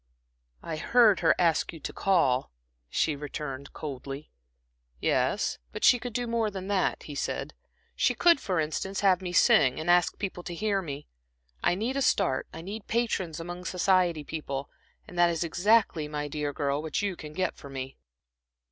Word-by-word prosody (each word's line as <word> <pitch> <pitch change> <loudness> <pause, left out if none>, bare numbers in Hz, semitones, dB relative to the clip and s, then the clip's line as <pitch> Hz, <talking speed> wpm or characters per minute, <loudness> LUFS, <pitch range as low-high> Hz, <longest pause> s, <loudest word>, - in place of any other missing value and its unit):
"I 160 -2 -4
heard 220 +1 +4
her - - +4
ask 170 -3 +2
you 165 - -10
to - - -5
call," 135 -10 +2 0.4
she 155 - +1
returned, 140 -1 -6
coldly. 140 0 -7 0.7
"Yes, - - +1
but - - -7
she 245 - +6
could 245 0 -6
do 245 +1 -1
more 230 -2 0
than 190 -1 -6
that," 195 -2 0
he 150 - -8
said. 140 - -3 0.4
"She - - +2
could, 345 -4 +5
for 185 -8 -1
instance, 160 +5 -2
have 190 -2 +4
me 180 -1 -4
sing 130 -6 +5
and 160 +2 +1
ask 175 -1 +3
people 190 -3 -4
to 175 - -5
hear 200 +1 0
me. 145 -4 -6 0.6
I - - +3
need 235 +8 -2
a - - +1
start, 205 -8 +1
I 165 - -8
need 205 +3 -7
patrons 195 -8 -1
among 175 +2 -7
society 180 -4 +2
people; 140 -3 -5 0.4
and 175 - -7
that 175 0 +6
is 170 0 -1
exactly, 180 -2 +2
my 150 -1 -3
dear 145 0 -3
girl, 140 0 -1
what 160 +5 -2
you 200 -2 -1
can 155 -2 -9
get 185 +2 -2
me." 135 -1 -7
175 Hz, 175 wpm, -28 LUFS, 150-195 Hz, 0.7 s, she